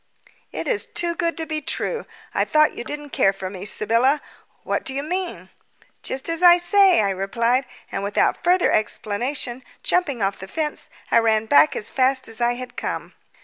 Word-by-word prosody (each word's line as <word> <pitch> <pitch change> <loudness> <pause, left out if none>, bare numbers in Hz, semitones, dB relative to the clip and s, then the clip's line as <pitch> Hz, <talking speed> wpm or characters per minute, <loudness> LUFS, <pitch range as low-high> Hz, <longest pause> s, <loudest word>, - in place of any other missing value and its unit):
"It - - -5
is 455 -4 -1
too 340 -1 +1
good 335 -1 -1
to 325 - -3
be 310 0 -3
true. 465 - -3 0.3
I - - +2
thought 305 0 +3
you - - -5
didn't 295 +2 -7
care 195 - +3
for 190 -1 -7
me. 190 0 -7
Sybylla, 230 +7 +2 0.4
what - - -2
do 265 - -4
you 280 - -2
mean?" 360 +3 -4 0.5
"Just 265 +1 -3
what 330 0 -1
I 350 -1 +8
say," 380 - +4
I 200 -1 +1
replied, 230 +7 0 0.2
and 195 - -3
without 200 +1 0
further 360 +1 +3
explanation, 240 +4 -1 0.2
jumping 285 - 0
off 195 0 -1
the 190 - -8
fence 305 +5 -4 0.2
I - - +6
ran 220 -1 +2
back 150 -7 +5
as 210 - -4
fast 260 0 +1
as 225 +1 -3
I 240 0 +2
had 250 0 -8
come. - - -5
260 Hz, 190 wpm, -22 LUFS, 215-325 Hz, 0.5 s, I